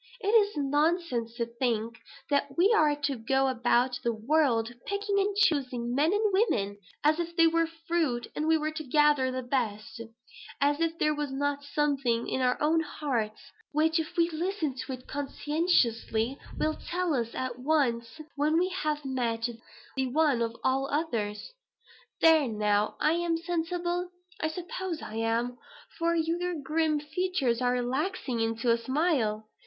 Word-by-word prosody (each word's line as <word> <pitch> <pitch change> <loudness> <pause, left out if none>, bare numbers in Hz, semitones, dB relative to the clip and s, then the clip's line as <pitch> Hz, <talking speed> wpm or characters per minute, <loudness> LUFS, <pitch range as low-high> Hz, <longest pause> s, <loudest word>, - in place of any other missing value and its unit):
It 410 - -2
is 420 -4 +4
nonsense 290 -4 0
to 235 -1 -1
think 230 -1 -2 0.3
that 280 -1 0
we 390 +6 +5
are 300 -7 +4
to 280 -1 0
go 265 +4 +1
about 245 0 +1
the 235 - +2
world, 235 -1 +1
picking 405 0 0
and 395 0 0
choosing 260 - +1
men 295 +6 +3
and 415 0 +1
women 205 - +1 0.2
as 305 +2 +3
if 340 0 -3
they 330 -1 +6
were 330 0 +3
fruit 325 -6 -1
and 305 - -1
we 320 0 +5
were 310 0 -2
to 310 0 -5
gather 295 -1 +3
the 255 0 -3
best; 230 -3 -2 0.6
as 290 +1 +2
if 330 0 0
there 305 -1 +2
was 295 -2 -3
not 285 +1 -1
something 275 -5 0
in 260 - -1
our 250 0 +2
own 315 +2 +3
hearts 250 -9 -3 0.2
which, 320 +2 +3
if 320 +1 -5
we 335 0 +4
listen 330 -2 -2
to 260 +1 -5
it 255 0 -9
conscientiously, 275 -5 0 0.2
will 310 - +1
tell 355 -2 -1
us 235 -3 -2
at 255 -1 -3
once 250 -4 0 0.2
when 300 +2 +2
we 365 +2 +2
have 305 -5 -2
met 235 -3 -1 0.5
the 265 -1 0
one 285 -2 +2
of 230 0 -1
all 270 +1 +1
others. 230 - -2 0.7
There 320 -4 +6
now, 210 -1 +1
am 335 +2 +2
I 330 - -4
sensible? 350 +1 -1 0.3
I 315 - +1
suppose 350 +1 -5
I 220 - -6
am, 230 +2 -1 0.4
for 335 0 +2
your 340 +2 0
grim 305 +1 +1
features 300 -6 -1
are 245 0 +2
relaxing 255 +1 -1
into 225 +1 +1
a 230 - +2
smile. 255 -6 0
290 Hz, 160 wpm, -29 LUFS, 240-330 Hz, 0.7 s, they